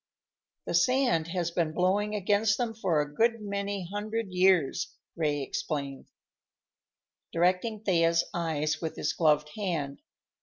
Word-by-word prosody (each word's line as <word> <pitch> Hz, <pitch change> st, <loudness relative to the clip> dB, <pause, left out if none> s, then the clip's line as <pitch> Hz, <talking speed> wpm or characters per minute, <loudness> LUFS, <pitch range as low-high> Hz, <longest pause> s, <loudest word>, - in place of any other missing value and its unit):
"The -, -, -3 dB
sand 250 Hz, -11 st, +3 dB
has 170 Hz, -1 st, -2 dB
been 165 Hz, -2 st, 0 dB
blowing 200 Hz, +4 st, +1 dB
against 205 Hz, +1 st, +2 dB
them 240 Hz, -3 st, -1 dB
for 185 Hz, -9 st, +1 dB
a 145 Hz, 0 st, -5 dB
good 230 Hz, +6 st, +2 dB
many 200 Hz, -2 st, -3 dB
hundred 210 Hz, +2 st, -4 dB
years," 180 Hz, -5 st, +2 dB, 0.2 s
Ray 150 Hz, -4 st, 0 dB
explained, 140 Hz, -1 st, -4 dB, 1.2 s
directing 185 Hz, +6 st, +1 dB
Thea's 165 Hz, -4 st, +3 dB
eyes 155 Hz, -3 st, -1 dB
with 160 Hz, -2 st, -3 dB
his -, -, -1 dB
gloved 150 Hz, -2 st, +2 dB
hand. 165 Hz, -9 st, -3 dB
180 Hz, 125 wpm, -29 LUFS, 160-205 Hz, 1.2 s, sand